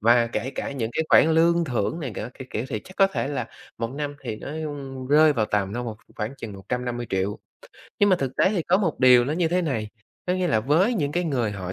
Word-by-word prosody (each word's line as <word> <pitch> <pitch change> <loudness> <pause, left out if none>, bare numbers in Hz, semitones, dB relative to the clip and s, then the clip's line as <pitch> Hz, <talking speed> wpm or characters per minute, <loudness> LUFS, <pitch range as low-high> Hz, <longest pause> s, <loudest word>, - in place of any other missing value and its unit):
Và 120 +2 +5
kể 120 +2 -3
cả 140 - -4
những 115 -5 -3
cái 160 - 0
khoản 160 0 +6
lương 170 +1 +4
thưởng 125 +3 -2
này 135 -6 -4
cả - - -5
các 130 - -9
kiểu 110 - -2
thì 110 - -3
chắc 185 - -14
có 195 - +6
thể 195 -7 -3
là 145 -2 -3 0.3
một 115 0 -2
năm 145 +1 -4
thì 110 - -4
nó - - -8 0.6
rơi 155 +1 +6
vào 110 -6 0
tầm 100 -2 -1
đâu 120 +1 -3
một 110 -2 -5 0.2
khoảng 110 +6 -3
chừng 115 -4 -7
150.000.000. 110 -2 -3 0.6
Nhưng 205 - +5
mà 185 - +5
thực 135 -5 -4
tế - - +4
thì 190 -6 0
có 180 - +3
một 175 -7 -1
điều 125 -2 +7
nó 145 - -1
như 165 0 +1
thế 180 +1 +1
này, 115 -9 -2 0.4
có 180 - +1
nghĩa 185 -1 0
là 110 -10 +2
với 165 - +2
những 145 -8 -1
cái 175 0 0
người 125 -8 0
họ 95 -2 -5
135 Hz, 250 wpm, -24 LUFS, 115-165 Hz, 0.6 s, điều